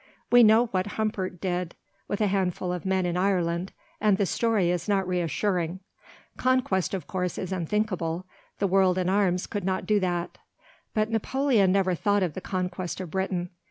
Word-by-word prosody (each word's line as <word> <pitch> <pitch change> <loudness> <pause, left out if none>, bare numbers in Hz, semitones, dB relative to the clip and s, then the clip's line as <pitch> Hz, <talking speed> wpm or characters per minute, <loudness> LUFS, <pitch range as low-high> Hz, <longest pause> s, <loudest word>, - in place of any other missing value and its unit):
We 245 0 +8
know 225 +1 +6
what 190 -4 -1
Humbert 195 -5 -2
did 180 -2 -2 0.3
with 205 - -2
a - - +4
handful 185 -2 0
of 180 +1 -5
men 190 -1 +1
in 175 -1 -1
Ireland, 180 -1 0 0.3
and 210 -2 +3
the 200 - +2
story 210 -4 +1
is 175 +2 -2
not 195 -2 +1
reassuring. 180 0 -1 0.6
Conquest, 250 -8 +1
of 185 - -5
course, 180 -3 -3
is 185 - -4
unthinkable. 185 -2 -1 0.3
The 200 - 0
world 190 -1 +3
in 185 -1 +1
arms 185 -2 +2
could 205 -3 -4
not 190 0 -1
do 210 -1 +3
that. 175 -2 -2 0.6
But 215 +1 +1
Napoleon 225 -3 +2
never 190 -1 +2
thought 205 +3 +1
of 175 -4 -1
the 185 - -6
conquest 180 -1 -3
of 180 -4 -6
Britain. 185 -2 -2
190 Hz, 175 wpm, -26 LUFS, 180-205 Hz, 0.6 s, We